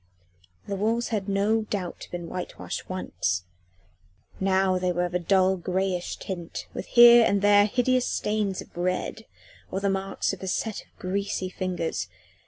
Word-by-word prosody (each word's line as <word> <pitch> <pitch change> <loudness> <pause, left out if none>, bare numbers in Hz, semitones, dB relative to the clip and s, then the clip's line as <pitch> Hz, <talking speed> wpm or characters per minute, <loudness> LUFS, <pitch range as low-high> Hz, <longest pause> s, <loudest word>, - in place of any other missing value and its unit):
The 200 - -2
walls 225 +4 0
had 205 -3 -2
no 205 +3 +2
doubt 185 -5 -4
been 175 -1 -6
whitewashed 180 +1 -6
once, 90 - -2 1.0
now 190 -1 +2
they 180 0 +1
were 175 0 0
of 175 - -5
a 180 - +1
dull 190 +1 +3
greyish 185 0 -1
tint, 175 -4 -6
with - - -6
here 240 0 +9
and 200 -2 +2
there 205 0 +6
hideous 250 +2 +1
stains 210 -3 -1
of - - -24
red 185 +5 -2 0.4
or 190 - -2
the 200 0 +1
marks 195 0 -1
of - - -8
a 190 - -5
set 215 +3 -2
of - - -22
greasy 190 0 -2
fingers. 185 -3 -3
190 Hz, 160 wpm, -26 LUFS, 180-205 Hz, 1.0 s, here